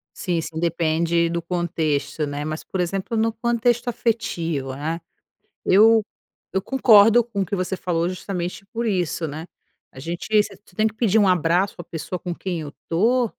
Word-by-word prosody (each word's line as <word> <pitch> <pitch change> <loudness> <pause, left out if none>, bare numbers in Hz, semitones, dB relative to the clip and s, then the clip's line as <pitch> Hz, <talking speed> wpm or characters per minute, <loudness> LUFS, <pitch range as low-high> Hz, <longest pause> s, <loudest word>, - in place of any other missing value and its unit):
Sim, 180 -6 -1
sim. 160 0 -6
Depende 170 0 +1
do 170 0 -2
contexto, 160 -4 -1
né, 145 +1 -4
mas, 155 +1 -4
por 190 - -5
exemplo, 195 +6 -1
no 225 +1 +1
contexto 235 +1 +1
afetivo, 170 - -1
né, 160 +4 -3 0.6
eu 220 +3 +6 0.5
eu 190 - 0
concordo 230 -3 +6
com 215 -4 -3
o - - 0
que 195 - -2
você 185 0 -2
falou, 170 -2 0
justamente 185 0 -5
por 230 +2 -3
isso, 175 -4 -1
né. 155 +2 -6 0.5
A - - -12
gente 170 +5 -5
você - - -7 0.2
tem 215 +2 +3
que 215 - -5
pedir 220 -2 +3
um 205 - +4
abraço 180 +2 +2
à 175 - -7
pessoa 165 +2 -5
com 175 0 -4
quem 175 -1 -4
eu 145 -2 -7 0.2
to 235 +8 +2
180 Hz, 175 wpm, -23 LUFS, 165-220 Hz, 0.6 s, eu